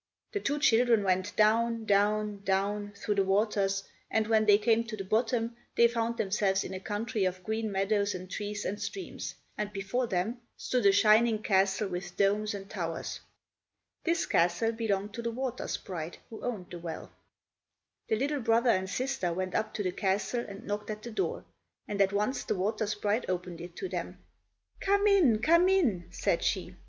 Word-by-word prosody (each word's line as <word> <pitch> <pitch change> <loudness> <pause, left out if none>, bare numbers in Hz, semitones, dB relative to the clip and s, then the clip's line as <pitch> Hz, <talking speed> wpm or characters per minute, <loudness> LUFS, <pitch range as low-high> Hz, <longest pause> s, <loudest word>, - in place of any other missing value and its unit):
The 410 - -1
two 290 -5 -1
children 235 -6 +4
went 185 +1 0
down—down—down—through 210 -2 +1
the 200 -1 +2
waters, 195 0 +1 0.3
and 220 -1 +1
when 220 0 +3
they 205 -1 +8
came 225 +2 +2
to 215 -1 -6
the 195 - -4
bottom 230 +3 0 0.2
they 235 - +6
found 235 0 -1
themselves 195 -1 +1
in 190 - -6
a 190 - -4
country 210 +1 -2
of 185 0 -1
green 220 +1 -2
meadows 200 +1 +1
and 185 0 -7
trees 205 +2 -4
and 205 +2 -3
streams, 385 - -5 0.2
and 210 -1 -2
before 200 +5 -1
them 215 +5 -1 0.2
stood 245 -5 +1
a - - +7
shining 215 +2 +4
castle 195 +1 +2
with 180 -1 -6
domes 205 +1 +2
and 195 -1 -7
towers. 165 -5 -4 0.8
This 335 -1 +1
castle 175 +7 +2
belonged 210 -3 -2
to 235 - -4
the 235 - -2
water 250 +1 -3
sprite 170 -3 -5
who 220 - -8
owned 215 -8 -4
the 175 - -6
well. 165 -1 -7 1.0
The 220 - +2
little 280 +4 -1
brother 230 +1 +3
and 190 -2 0
sister 255 -4 -1
went 185 +2 -3
up 215 0 0
to 205 - -1
the 185 - 0
castle 200 +6 0
and 200 0 -9
knocked 205 +1 -3
at 215 0 -5
the 235 - -6
door, 215 - -2 0.4
and 200 -1 -1
at 195 -1 +4
once 210 +6 0
the - - -1
water 210 +3 -1
sprite 210 +1 -1
opened 180 -2 -3
it 175 0 -9
to 380 - -4
them. - - -5 0.6
"Come 400 +1 +2
in, 315 - +4
come 340 +5 +5
in," 250 - +2
said - - 0
she. - - -1
210 Hz, 180 wpm, -30 LUFS, 195-230 Hz, 1.0 s, they